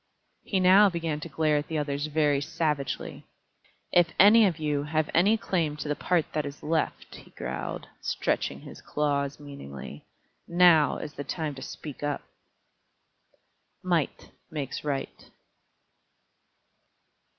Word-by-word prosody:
He 195 - 0
now 190 +3 +7
began 165 -4 -2
to 165 - -7
glare 155 0 +2
at 145 - -3
the 160 - -2
others 145 0 -2
very 150 -2 +2
savagely. 150 -3 -3 0.6
"If 175 -1 +5
any 210 +2 +8
of 170 -4 -2
you 150 -2 -1
have 155 +1 -1
any 200 +7 +4
claim 165 -8 -1
to 150 - -5
the 150 - 0
part 175 0 +1
that 150 - 0
is 145 0 -8
left," 160 +1 -1
he - - -15
growled, - - -5
stretching - - -1
his - - -11
claws 145 -1 -1
meaningly, 75 - -9 0.4
"now 170 -4 +5
is 150 - -7
the 145 - -6
time 155 +1 -3
to 135 - -10
speak 150 0 -8
up." 145 -1 -2 1.6
_Might - - -1 0.2
makes 145 -4 -4
right. 140 -2 -4
150 Hz, 135 wpm, -27 LUFS, 145-170 Hz, 1.6 s, any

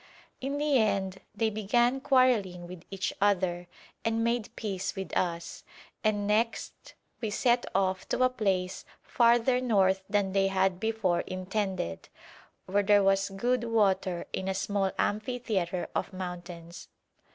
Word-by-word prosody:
In 275 +2 -2
the 290 -3 +3
end 195 -3 0
they 220 +2 +1
began 240 +5 +1
quarrelling 230 -11 +2
with 175 -1 -9
each 195 -1 -2
other 180 -3 +1 0.4
and 225 0 0
made 235 0 0
peace 195 -3 -3
with 190 -1 -5
us, 170 -2 -2 0.4
and 210 -2 +1
next 220 +3 -1 0.3
we 220 - -1
set 240 +3 +2
off 190 -1 0
to 255 - +1
a 255 - +5
place 190 -6 -1 0.2
farther 240 +1 +3
north 195 -6 +3
than 200 -2 +1
they 195 0 +3
had 190 -1 +1
before 215 -5 0
intended, 185 - -3 0.6
where 200 +2 +2
there 205 0 +4
was 195 0 +3
good 235 +5 0
water 195 -6 +1
in 190 - -3
a 190 - -1
small 195 0 0
amphitheatre 210 -6 -1
of - - -2
mountains. 175 -2 -7
200 Hz, 140 wpm, -29 LUFS, 185-230 Hz, 0.6 s, a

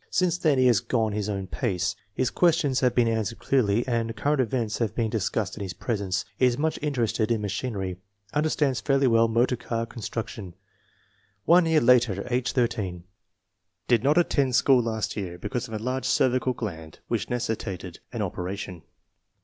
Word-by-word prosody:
Since 180 -1 +1
then 155 -6 +3
he 130 - +4
has 120 -5 +5
gone 110 +1 0
his 105 0 -2
own 100 -2 -2
pace. 95 -2 -1 0.2
His 125 +4 -1
questions 160 -6 +2
have 125 -2 +2
been 120 -2 +4
answered 110 -1 -1
clearly, 120 -3 +1
and 115 -2 -1
current 145 +5 +1
events 115 -2 -1
have 115 -3 -1
been 115 -3 0
discussed 110 -2 -1
in 110 - -8
his 95 -2 -5
presence. 100 -4 -2
Is 125 -2 +3
much 160 +2 -1
interested 120 -7 0
in 115 -2 +1
machinery. 100 -3 -3 0.4
Understands 150 -3 +1
fairly 135 -1 +2
well 115 -2 +4
motor 120 +3 +2
car 115 -1 -3
con 115 0 -10
struction. 110 -5 -5 0.9
One 175 0 +5
year 160 -1 +4
later, 120 -5 +3
age 125 +2 -1
18. 105 -8 -1 0.8
Did 120 -2 +3
not 145 +4 +3
attend 140 -7 +2
school 130 -1 +5
last 110 -2 -2
year 90 -4 -5
because 125 +7 -4
of 110 - -6
an 105 - -4
enlarged 130 +3 -2
cervical 130 0 +2
gland 80 -10 -6
which - - -2
necessitated 105 -7 -3
an 115 -4 -2
operation. 90 -1 -5
115 Hz, 175 wpm, -26 LUFS, 105-130 Hz, 0.9 s, has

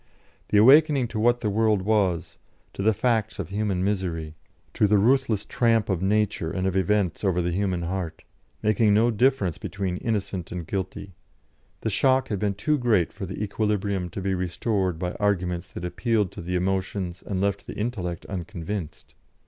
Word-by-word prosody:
The 105 - +3
awakening 135 +2 +6
to 110 - -4
what 120 +2 +3
the 105 - 0
world 105 -2 +2
was, 95 -5 0 0.3
to - - -5
the 110 +3 +4
facts 110 0 0
of - - -5
human 100 -2 -1
misery, 90 -6 -2 0.4
to 105 - +3
the 105 +1 +4
ruthless 115 -1 +2
tramp 115 -3 +2
of 95 -3 0
nature 100 -4 +1
and 95 +2 -2
of 95 -1 0
events 95 -1 +1
over 95 -3 +2
the 90 0 0
human 90 -1 -1
heart, 90 -1 -4 0.4
making 110 0 +3
no 115 +3 +4
difference 110 - +1
between 95 -2 -3
innocent 100 -6 -3
and 90 -2 -5
guilty 95 +1 -4 0.7
the 110 - -1
shock 130 +5 +2
had 105 - -1
been 100 -1 0
too 150 +9 0
great 110 -9 +2
for 95 -2 -6
the 95 +3 -4
equilibrium 100 -3 -1
to 95 - -6
be 95 0 0
restored 95 0 -1
by 90 +1 -2
arguments 90 -4 -1
that 90 - -5
appealed 105 +1 0
to - - -8
the 90 +2 -3
emotions 95 0 -2
and 95 -2 -3
left 100 0 -1
the - - -7
intellect 95 -7 -3
unconvinced. 90 -1 -6
100 Hz, 175 wpm, -25 LUFS, 90-110 Hz, 0.7 s, awakening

